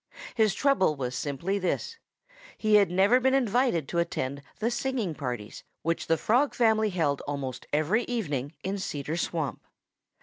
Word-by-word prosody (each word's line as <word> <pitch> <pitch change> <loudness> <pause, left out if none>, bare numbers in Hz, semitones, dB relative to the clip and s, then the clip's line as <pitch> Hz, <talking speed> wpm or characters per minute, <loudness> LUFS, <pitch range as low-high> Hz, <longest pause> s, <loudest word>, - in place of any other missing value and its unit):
His 215 -5 +2
trouble 275 - +3
was 125 -2 -3
simply 155 +10 -2
this: 455 - -2 0.6
he 215 -1 +1
had 205 -3 +6
never 195 +7 +4
been 265 +1 +3
invited 240 - +2
to 170 - 0
attend 140 -5 -2 0.2
the 230 +2 0
singing 240 -7 -1
parties 120 -7 -5 0.2
which 165 +1 -1
the 165 - +3
Frog 250 - +2
family 220 -2 +3
held 160 -7 0
almost 140 -3 -4
every 160 +11 +2
evening 150 - -3
in 195 +2 -2
Cedar 150 -4 -3
Swamp. 165 -4 -2
185 Hz, 155 wpm, -28 LUFS, 145-225 Hz, 0.6 s, had